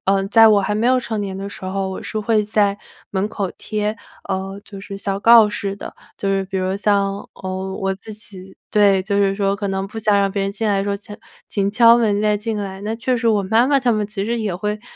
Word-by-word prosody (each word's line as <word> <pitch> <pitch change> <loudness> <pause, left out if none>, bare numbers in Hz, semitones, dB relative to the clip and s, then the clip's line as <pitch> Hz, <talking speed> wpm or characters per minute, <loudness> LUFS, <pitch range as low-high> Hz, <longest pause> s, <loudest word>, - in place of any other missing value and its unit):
呃， 195 0 +2
在 225 +2 +7
我 210 -2 +5
还 210 - -1
没 220 +3 +1
有 255 0 +4
成 225 -3 -3
年 195 -2 -4
的 195 +1 -5
时 200 - -9
候， 190 0 -2
我 190 - -6
是 215 - -4
会 215 0 +2
在 205 -1 +1 0.3
门 195 +1 -1
口 200 -3 -3
贴， 210 0 -2 0.3
呃， 195 +1 -3
就 200 -2 -10
是 195 0 -8
小 195 0 -2
告 230 -1 +7
示 200 -1 -4
的。 - - -9 0.2
就 200 - -2
是 195 0 0
比 190 0 -4
如 185 0 -1
像， 200 -1 0
呃， 190 0 -5
我 195 0 -1
自 205 +3 -11
己 190 -3 -11
对， 200 -2 +4
就 200 +1 -1
是 195 -1 +2
说 195 -1 0
可 200 0 -3
能 195 0 -2
不 220 +3 -8
想 210 -2 +2
让 195 -1 +1
别 200 - -1
人 195 - -1
进 220 +3 -3
来 200 -2 +2
的 - - 0
时 - - -3
候 200 - 0
写 205 +1 -11 0.3
“请 200 -1 0
敲 230 +2 +6
门 210 -3 +1
再 210 -1 +2
进 220 +1 -3
来”。 195 -2 -5
那 215 +2 -3
确 250 +2 0
实 235 -1 +1
我 210 -2 +2
妈 220 +5 +3
妈 280 0 +3
他 250 -3 +1
们 215 -1 0
其 200 -1 -4
实 235 +2 -1
也 205 -5 -2
会， 210 +2 -3
200 Hz, 275 characters per minute, -20 LUFS, 195-215 Hz, 0.3 s, 在